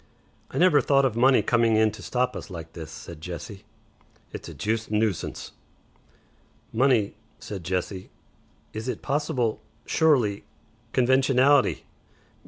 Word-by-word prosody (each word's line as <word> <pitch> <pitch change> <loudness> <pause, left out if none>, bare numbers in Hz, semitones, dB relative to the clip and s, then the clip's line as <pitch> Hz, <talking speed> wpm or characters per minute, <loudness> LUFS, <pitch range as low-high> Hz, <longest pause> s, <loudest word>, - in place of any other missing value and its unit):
"I - - -6
never 175 -5 +5
thought 140 +1 +3
of 125 -4 0
money 130 +3 +4
coming 115 -2 +3
in 110 0 +4
to 105 -1 -11
stop 125 +8 -1
us - - -7
like 80 -3 -8
this," 80 -2 -8
said 80 0 -10
Jessie. 95 +4 -8 0.7
"It's - - -7
a - - -8
juiced 110 +1 -2
nuisance." 105 -5 -1 1.2
"Money," 120 -4 +3 0.2
said 95 -4 -7
Jessie. 90 +1 -3 0.6
"Is 110 +3 -5
it 125 - -4
possible 135 -6 -1 0.2
Surely! 125 -11 +2 0.5
Conventionality! 130 +2 +3
115 Hz, 125 wpm, -25 LUFS, 100-130 Hz, 1.2 s, never